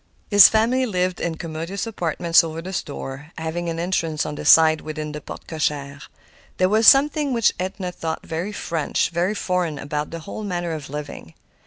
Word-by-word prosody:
His 205 -1 +10
family 240 +4 +2
lived 185 -3 -1
in 170 -1 -2
commodious 165 +5 -5
apartments 170 -5 +2
over 160 0 -5
the 185 +3 -7
store, 145 -2 -6
having 165 +2 -3
an 165 0 -4
entrance 165 -3 -1
on - - -4
the 150 - -7
side 160 -1 +6
within 155 -1 -5
the 150 0 -7
porte - - -10
cochère. 145 -3 -3 0.6
There 185 0 +3
was 220 +2 +3
something 285 0 +5
which 230 -3 +3
Edna 185 0 -4
thought 160 -2 -5
very 170 +5 -4
French, 165 -7 -1
very 175 +5 0
foreign, 180 -6 -1
about 150 +1 -4
their 165 - -6
whole 200 +6 -7
manner 175 -4 -3
of 155 -4 -6
living. 145 - -8
170 Hz, 180 wpm, -22 LUFS, 155-190 Hz, 0.6 s, His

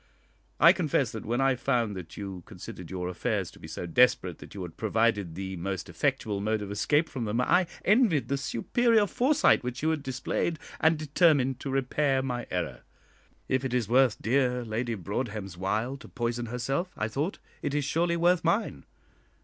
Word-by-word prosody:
I - - +8
confess - - 0
that, - - -7
when 120 +3 0
I 135 0 +4
found 120 -4 0
that 90 -3 -9
you 95 -3 -6
considered 90 -3 -9
your 90 -1 -3
affairs 90 - -2
to - - -17
be - - -10
so - - -5
desperate 90 -2 +3
that - - -12
you 95 - -5
had 85 -2 -8
provided 110 -5 +1
the 95 0 -5
most 95 +1 -4
effectual 100 -2 -1
mode 110 0 0
of 100 - -6
escape 145 +10 +2
from 130 -6 -4
them, 110 +3 -1
I 180 +8 +3 0.2
envied 210 - +4
the 140 - 0
superior 220 - +2
foresight 255 - +3
which 125 +3 -4
you 160 - +3
had 155 -2 -1
displayed, 135 +5 -2 0.2
and 160 0 +4
determined 145 -4 +2
to 140 - -5
repair 135 0 +1
my 125 -2 -3
error. 90 - -3 0.7
If 130 0 0
it 130 -2 -1
is 120 -4 0
worth 125 -1 +3
dear 125 0 +1
Lady 115 +1 -2
Broadhem's 105 -1 -4
while 110 +8 -1
to - - -13
poison 120 -1 -3
herself, 135 +9 -2
I 110 - 0
thought, 145 - -2 0.2
it 145 -1 -2
is 145 -2 0
surely 170 +3 +1
worth 175 +1 +3
mine. 185 +7 0
125 Hz, 185 wpm, -28 LUFS, 105-145 Hz, 0.7 s, I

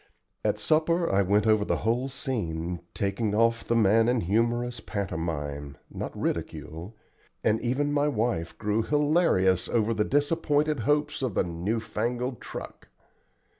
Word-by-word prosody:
At - - +1
supper 165 +2 +2
I 95 - +4
went 100 +2 +2
over 110 -1 +4
the - - 0
whole 120 +4 +1
scene, 90 -10 -3 0.2
taking 105 +1 -1
off 115 +1 +3
the 115 - 0
man 115 +1 +4
in 125 -2 +2
humorous 120 +5 0
pantomime, 75 -7 -4
not - - -6
ridicule, 85 +8 -4 0.5
and 110 +1 +2
even 145 +4 0
my 145 0 +2
wife 110 - -1
grew 105 +1 0
hilarious 145 - +2
over 115 0 +1
her 105 -1 +1
disappointed 145 +1 +1
hopes 150 -1 +1
of 125 -7 -2
the - - +3
"new 90 +6 -2
fangled 120 +2 -3
truck." - - -8
115 Hz, 140 wpm, -27 LUFS, 95-130 Hz, 0.5 s, I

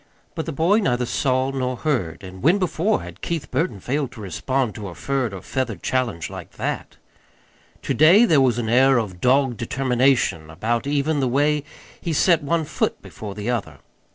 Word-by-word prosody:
But 160 -1 -4
the - - -2
boy 170 +9 +3
neither 125 - +1
saw 130 +2 0
nor 130 -1 -2
heard 115 - -2
and 95 0 -10
when 170 +7 +4
before 190 +2 0
had - - -11
Keith 165 -3 -4
Burton 160 - -1
failed 135 +5 -2
to 120 - -12
respond 125 +5 -1
to 105 -2 -7
a 85 - -8
furred 135 -4 -1
or 95 -2 -8
feathered 125 -5 -3
challenge 125 -11 -1
like - - -9
that? - - -4 0.9
To - - -1
day 175 - +7
there 155 -10 +4
was 125 -3 +3
an 120 -2 -2
air 130 +3 +5
of 95 -6 -3
dogged 130 -1 +3
determination 125 - +1
about 115 - -2
even 145 +1 +1
the 135 - +1
way 145 +3 +2 0.4
he 170 - -2
set 165 +1 +4
one 160 +2 0
foot - - -1
before 105 -2 -8
the 105 +4 -2
other. 120 -4 -3
130 Hz, 185 wpm, -22 LUFS, 115-150 Hz, 0.9 s, day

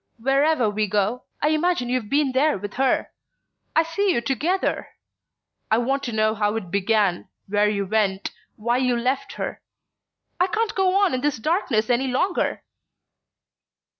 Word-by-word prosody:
Wherever 270 +1 +2
we 210 0 0
go, 210 +5 -1 0.2
I 300 - +4
imagine 310 -4 +1
you've 245 -4 -2
been 285 -1 +2
there 285 +2 +2
with 205 +1 -7
her...I 270 +4 -2
see 385 +5 0
you 235 - +1
together. 295 +10 -1 0.8
I 220 - +3
want 270 +4 0
to 240 - -3
know 215 0 +2
how 210 0 0
it 190 -6 -5
began, 200 -2 +1 0.2
where 205 +1 +2
you 200 -1 -1
went, 200 -1 0 0.2
why 235 +3 0
you 250 -2 +1
left 255 +3 -1
her...I 360 - -6
can't 435 +3 -1
go 380 -1 +2
on 400 -6 +3
in 255 - -1
this 290 -1 0
darkness 225 - 0
any 250 +2 +1
longer!" 345 +9 0
250 Hz, 150 wpm, -23 LUFS, 215-300 Hz, 0.8 s, I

